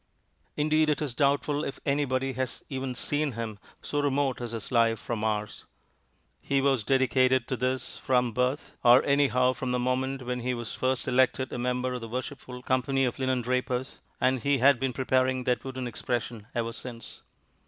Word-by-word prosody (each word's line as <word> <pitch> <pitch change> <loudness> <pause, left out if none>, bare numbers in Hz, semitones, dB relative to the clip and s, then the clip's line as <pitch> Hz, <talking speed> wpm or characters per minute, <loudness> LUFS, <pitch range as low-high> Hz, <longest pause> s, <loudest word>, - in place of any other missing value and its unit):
Indeed, 155 +1 +3
it 150 - +1
is 145 -5 -3
doubtful 145 +2 +1
if - - -5
anybody 135 -2 0
has 130 -1 -3
even 130 -2 -3
seen 145 +2 -1
him, 110 -2 -5 0.2
so 145 - -2
remote 140 -2 0
is 120 -2 -4
his 115 0 -5
life 115 -2 +3
from 110 -1 -4
ours. 105 -1 -2 0.8
He 140 - +1
was 135 -4 +2
dedicated 130 0 +3
to 130 - 0
this 130 +1 -2
from 125 -2 +2
birth, 125 +5 -1
or 120 +2 +7
anyhow 130 -3 +3
from 130 -1 -3
the 125 - +1
moment 130 +2 -1
when 125 0 -2
he 125 +1 -1
was 120 -2 -6
first 130 -1 -1
elected 130 0 +2
a - - -3
member 125 +1 -1
of 125 - -4
the 115 - -7
Worshipful 125 0 -6
Company 130 +1 +1
of 125 - -2
Linendrapers, 130 0 -1 0.2
and 130 0 +2
he 140 +4 +2
has 135 +2 +5
been 135 +1 -1
preparing 130 0 +1
that 125 -2 0
wooden 130 -1 -5
expression 120 -2 -3
ever 115 -1 -1
since. 120 -2 -8
130 Hz, 175 wpm, -28 LUFS, 120-135 Hz, 0.8 s, or